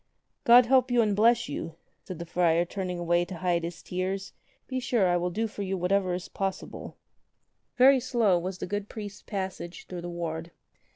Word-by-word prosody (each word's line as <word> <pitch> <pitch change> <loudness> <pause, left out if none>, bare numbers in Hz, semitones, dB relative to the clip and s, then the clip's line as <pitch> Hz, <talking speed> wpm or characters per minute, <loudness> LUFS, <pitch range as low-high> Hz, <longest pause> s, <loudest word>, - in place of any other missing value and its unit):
"God 240 +1 +8
help 260 +1 +4
you 240 -1 +4
and 210 -2 +1
bless 230 +3 +4
you," 165 -1 -5 0.3
said 185 - -6
the 170 - -6
friar 170 0 +2
turning 185 -1 -4
away 175 0 +2
to 180 +1 -7
hide 175 -1 0
his 170 +1 -6
tears. 190 +2 -3 0.3
"Be 260 -1 -2
sure 235 -6 +2
I 175 - +2
will 175 0 0
do 215 +6 -1
for 210 -2 -6
you 195 -1 -2
what 180 +1 -2
ever 190 -3 +2
is 180 - -6
possible." 195 -1 -5 0.8
Very 265 +2 +7
slow 235 -7 +2
was 185 +2 -4
the - - -4
good 205 +2 -4
priest's 205 -2 -7
passage 190 -3 -5
through 180 -1 -7
the 175 - -6
ward. 165 -1 -4
190 Hz, 195 wpm, -28 LUFS, 175-215 Hz, 0.8 s, God